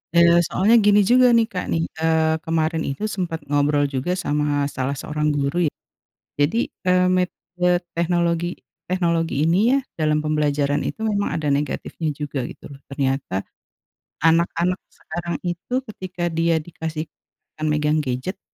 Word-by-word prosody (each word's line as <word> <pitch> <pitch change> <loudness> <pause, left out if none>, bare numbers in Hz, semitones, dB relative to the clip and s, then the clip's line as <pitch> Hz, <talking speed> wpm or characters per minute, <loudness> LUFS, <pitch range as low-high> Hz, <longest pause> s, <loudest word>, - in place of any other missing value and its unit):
Eee, 170 0 +6
soalnya 210 +5 +3
gini 205 0 +6
juga 255 0 +7
nih, 225 - +4
Kak, 180 -1 -3
nih. 165 - +1 0.2
Eee, 160 -1 +3
kemarin 160 0 0
itu 140 +10 -5
sempat 170 -4 -2
ngobrol 145 0 +2
juga 135 +4 -2
sama 145 -1 +1
salah 135 +2 -2
seorang 150 +2 -1
guru 145 +3 -1
ya. - - -49 0.7
Jadi, 165 +12 +1 0.2
eee, 180 0 +4
metode 180 0 0
teknologi 170 0 +1 0.4
teknologi 170 -5 +1
ini 170 +3 +3
ya 275 - +4 0.2
dalam 155 -1 +2
pembelajaran 145 -2 +1
itu - - -7
memang 205 -2 0
ada 155 -2 -2
negatifnya 150 +3 -2
juga 145 -2 -3
gitu - - -13
loh. 140 - -12
Ternyata, 135 -8 -1 0.8
anak-anak 170 +2 +2
sekarang 175 0 -6
itu 175 +7 -4 0.2
ketika 185 -3 -6
dia 165 0 +2
dikasih 160 -2 -5 0.6
kan 155 - -2
megang 150 0 +2
gadget, 135 +8 -3
160 Hz, 140 wpm, -22 LUFS, 145-175 Hz, 0.8 s, juga